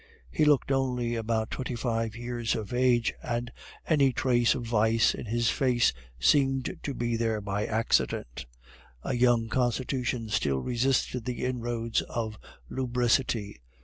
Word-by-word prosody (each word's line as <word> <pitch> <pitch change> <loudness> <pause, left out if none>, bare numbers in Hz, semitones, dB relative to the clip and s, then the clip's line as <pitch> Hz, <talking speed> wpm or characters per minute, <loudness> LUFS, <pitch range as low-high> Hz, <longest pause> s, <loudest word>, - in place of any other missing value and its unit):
He 155 - +2
looked 145 -2 +3
only 125 -3 0
about 110 -1 -1
twenty 130 -1 -3
five 115 -2 -2
years 120 -1 -2
of 110 +1 -5
age, 120 -2 +2
and 120 0 -3 0.4
any 140 -4 +4
trace 120 -1 +2
of 125 - -4
vice 110 0 +3
in - - -7
his 115 +1 +1
face 125 -3 +2 0.3
seemed 135 - +2
to 140 - -4
be 120 -1 -1
there 115 -1 0
by 100 +1 -2
accident. 65 - 0 0.6
A - - -2
young 120 -2 +3
constitution 125 -1 -1
still 70 -10 +1
resisted 125 - 0
the 125 0 -3
inroads 120 -2 -1
of 110 -2 -4 0.3
lubricity. 120 - 0
120 Hz, 140 wpm, -28 LUFS, 115-125 Hz, 0.6 s, any